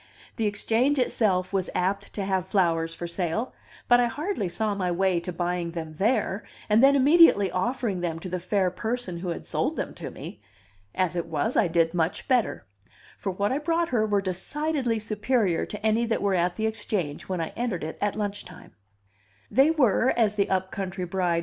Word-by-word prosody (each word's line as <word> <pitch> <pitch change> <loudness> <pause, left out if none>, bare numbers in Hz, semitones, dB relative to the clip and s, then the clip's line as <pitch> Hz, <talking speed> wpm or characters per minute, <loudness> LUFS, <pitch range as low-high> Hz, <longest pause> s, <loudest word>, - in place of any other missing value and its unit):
The 220 - +1
Exchange 230 +7 +1
itself 200 -7 +1
was 190 -2 0
apt 195 +2 -1
to 200 - -3
have 190 -2 -1
flowers 165 -4 +1
for 175 - -5
sale, 175 +7 -2 0.3
but 245 0 +6
I 245 - +3
hardly 295 - -2
saw 215 +3 -1
my 190 -3 -1
way 180 0 +1
to 180 +2 -5
buying 175 0 -2
them 160 -2 -5
there, 210 -1 +1 0.2
and 215 +3 +4
then 275 +1 +7
immediately 275 - +6
offering 210 0 -1
them 165 -2 -2
to - - -6
the 180 0 -3
fair 185 +1 0
person 220 -2 -3
who 180 0 -4
had 170 - -5
sold - - -1
them - - -4
to - - -7
me. - - -9 0.5
As 185 -2 0
it 170 -1 -2
was, 165 - -1
I 205 - +4
did 165 0 +2
much 170 -1 -1
better; 250 -4 +1 0.5
for 195 - -4
what 200 +4 -1
I 270 - 0
brought 330 +2 0
her 235 -4 +2
were 205 -1 +2
decidedly 245 - -2
superior 215 -3 0
to 210 +1 -6
any 225 +2 +2
that 225 - -1
were 200 -1 +2
at 175 0 +1
the 220 - -2
Exchange 210 -9 -3
when 185 -2 -1
I 165 - -2
entered 230 -9 -2
it 160 - -6
at 205 -1 0
lunch 205 -1 -3
time. - - -14
200 Hz, 180 wpm, -26 LUFS, 180-230 Hz, 0.5 s, then